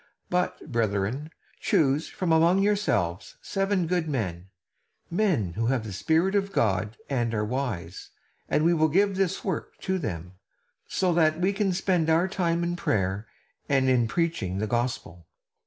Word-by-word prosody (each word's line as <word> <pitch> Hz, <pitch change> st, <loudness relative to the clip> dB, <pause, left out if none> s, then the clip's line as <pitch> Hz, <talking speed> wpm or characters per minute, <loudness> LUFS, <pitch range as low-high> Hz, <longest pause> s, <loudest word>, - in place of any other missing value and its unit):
But, 180 Hz, -4 st, -1 dB
brethren, 115 Hz, +5 st, -1 dB, 0.3 s
choose 145 Hz, +1 st, +2 dB
from 180 Hz, -3 st, -2 dB
among 170 Hz, +4 st, +4 dB
yourselves 150 Hz, -, 0 dB
seven 195 Hz, -2 st, 0 dB
good 175 Hz, -1 st, 0 dB
men; 95 Hz, -, -3 dB, 0.6 s
men 170 Hz, -, +1 dB
who 115 Hz, +4 st, -1 dB
have 125 Hz, -3 st, +1 dB
the 105 Hz, -3 st, -6 dB
Spirit 165 Hz, -, +1 dB
of 200 Hz, -1 st, +1 dB
God 110 Hz, -, 0 dB
and 120 Hz, -4 st, -1 dB
are 105 Hz, 0 st, 0 dB
wise, 125 Hz, -6 st, -4 dB, 0.4 s
and 155 Hz, -, +2 dB
we 170 Hz, -, +5 dB
will 155 Hz, -1 st, +3 dB
give 195 Hz, +5 st, +2 dB
this 190 Hz, -1 st, 0 dB
work 185 Hz, -6 st, -3 dB
to 190 Hz, -1 st, -1 dB
them; 90 Hz, -, -5 dB, 0.5 s
so 185 Hz, -2 st, +1 dB
that 160 Hz, -1 st, +3 dB
we 190 Hz, +3 st, +2 dB
can 200 Hz, -1 st, +1 dB
spend 180 Hz, -3 st, +1 dB
our 165 Hz, +3 st, +3 dB
time 175 Hz, -3 st, 0 dB
in 175 Hz, 0 st, -1 dB
prayer 100 Hz, -, -1 dB, 0.4 s
and 135 Hz, -2 st, +3 dB
in 120 Hz, -3 st, +3 dB
preaching 120 Hz, -, -1 dB
the 105 Hz, -, -1 dB
gospel." 120 Hz, -8 st, -3 dB
155 Hz, 155 wpm, -26 LUFS, 110-180 Hz, 0.6 s, we